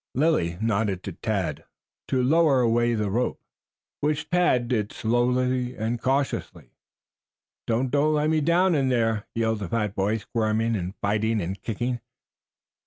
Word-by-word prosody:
Lilly 125 - +1
nodded 105 -4 0
to - - -5
Tad - - -3 0.4
to 130 -1 +1
lower 145 -1 +4
away 120 0 +2
on - - -2
the 100 -2 -1
rope, 120 +4 -1 0.6
which 150 +1 -1
Tad 170 -9 +3
did 110 -4 -1
slowly 125 +2 0
and 115 +2 -2
cautiously. 135 +2 -2 1.0
"Don't 120 +3 0
don't 150 +2 +2
let 150 +1 +1
me 155 -1 +2
down 175 +4 +3
in 135 -4 +2
there!" 115 -4 0
yelled 110 -1 0
the 100 -4 -5
fat 105 -3 -1
boy, 105 +3 0
squirming 110 0 0
and 95 -1 -4
fighting 105 +2 +1
and 95 +1 -4
kicking. 120 +4 -2
120 Hz, 150 wpm, -25 LUFS, 110-135 Hz, 1.0 s, lower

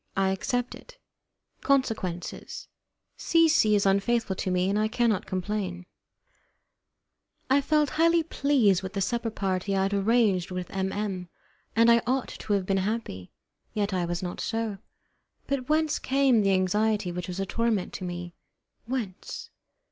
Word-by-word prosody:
I 195 0 +3
Accept 245 +6 -1
It - - -14 0.6
Consequences 220 -10 -1 0.5
C. 330 -1 +4
C. 215 -9 +4
is 200 - +2
Unfaithful 200 +1 +1
to 190 - -2
Me, 180 0 +1
and 200 +2 +1
I 215 - +2
Cannot 220 -3 0
Complain 185 -1 -3 1.7
I 280 +1 +5
felt 300 0 +2
highly 335 +1 +3
pleased 265 - +2
with 190 0 -6
the 200 - -2
supper 235 +3 -1
party 195 -2 -1
I 190 - +2
had 195 +1 0
arranged 200 -3 +2
with 180 -1 -5
M 190 0 -1
M, 195 -4 -3 0.5
and 230 +1 +6
I 235 0 +5
ought 260 0 0
to 210 - -4
have 195 -2 +1
been 195 +1 +1
happy. 190 - -3 0.4
Yet 205 -1 0
I 180 -2 0
was 175 +1 -3
not 175 -1 -4
so; 225 -3 -2 0.7
but 275 -2 -3
whence 310 0 +2
came 265 -4 +3
the 195 -1 +3
anxiety 205 +1 +1
which 180 0 -5
was 180 +1 -5
a 195 - 0
torment 225 -2 -1
to - - -6
me? 175 -1 -5 0.5
Whence? 235 -7 -5
205 Hz, 155 wpm, -27 LUFS, 185-240 Hz, 1.7 s, and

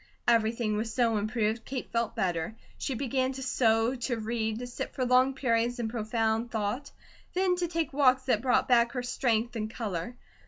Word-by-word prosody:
Everything 225 -2 +2
was 220 +1 -2
so 230 -2 +2
improved, 215 +1 -1
Kate 260 -1 -5
felt 230 -2 -1
better. 175 +2 -1 0.2
She 265 - -2
began 260 +1 0
to 265 0 -6
sew, 225 -2 +2
to 245 -1 -2
read, 220 0 -2
to 245 - -5
sit 245 - -6
for 255 - 0
long 255 +2 +4
periods 240 -2 +1
in 235 -2 -2
profound 225 0 0
thought, 225 +5 -2 0.5
then 370 -1 +3
to 350 -1 0
take 330 -4 -2
walks 260 -2 +4
that 245 -5 +1
brought 260 0 +2
back 240 -1 +4
her 250 - -2
strength 240 -1 0
and 215 -1 -2
colour. 220 -1 -4
235 Hz, 185 wpm, -29 LUFS, 220-255 Hz, 0.5 s, long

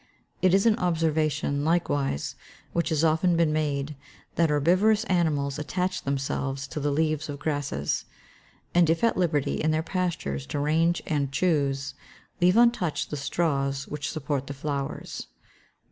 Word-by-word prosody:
It 185 0 +5
is 195 - +3
an 225 -2 +4
observation, 155 -4 0
likewise, 145 - 0 0.4
which 170 +1 0
has 160 -1 +1
often 165 +2 +3
been 165 -2 +3
made, 150 -1 -1 0.4
that 165 -1 +2
herbivorous 185 +9 +3
animals 155 - 0
attach 180 +5 -2
themselves 135 0 -2
to - - -4
the 145 0 0
leaves 155 +1 0
of 145 - -4
grasses; 140 - -2 0.7
and, 175 -2 +4
if 165 +4 +1
at 230 - +3
liberty 155 -6 0
in 155 - +1
their 155 0 +1
pastures 165 - -2
to - - -3
range 160 +4 +2
and 145 -5 -1
choose, 140 -4 0 0.5
leave 180 +4 +5
untouched 235 -9 +2
the - - -2
straws 140 -2 -1
which 150 0 -4
support 140 -3 -3
the 140 - -5
flowers. 140 -1 -4
155 Hz, 145 wpm, -26 LUFS, 140-170 Hz, 0.7 s, It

